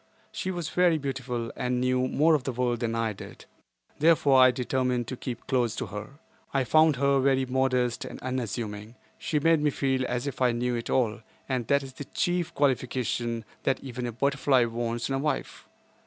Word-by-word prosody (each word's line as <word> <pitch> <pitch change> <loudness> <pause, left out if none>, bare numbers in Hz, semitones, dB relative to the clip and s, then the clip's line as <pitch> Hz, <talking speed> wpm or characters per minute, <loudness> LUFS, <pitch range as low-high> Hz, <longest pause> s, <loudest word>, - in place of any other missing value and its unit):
She 185 - -4
was 175 -4 -3
very 180 -2 +3
beautiful 130 -4 -4
and 125 0 -1
knew 130 0 +1
more 160 +5 +3
of 150 -4 +2
the 130 - -2
world 120 -1 -1
than 115 -1 -1
I 115 -1 0
did, - - -11 0.5
therefore 145 -4 +5
I 130 - +8
determined 125 -1 -1
to 130 - -4
keep 120 -1 -6
close 120 -4 0
to - - -3
her. 105 +6 -8 0.4
I 135 - +3
found 155 +3 +4
her 140 +1 +2
very 135 0 +2
modest 130 -2 0
and - - -8
unassuming. 115 -3 -4 0.2
She 150 - 0
made 165 +1 +3
me 150 - +3
feel 135 -2 0
as 125 +1 -2
if 135 -2 -5
I 125 -2 +4
knew 120 +1 -1
it 115 -1 -4
all, 120 -3 +1 0.3
and 125 -4 -2
that 140 0 +3
is 135 -1 -9
the 145 - -8
chief 175 +2 -1
qualification 125 -4 0 0.2
that 135 - 0
even 125 -2 -5
a - - -3
butterfly 135 0 +2
wants 115 0 -2
in 135 - -2
a 135 - 0
wife. 150 +2 -3
130 Hz, 195 wpm, -27 LUFS, 120-140 Hz, 0.5 s, I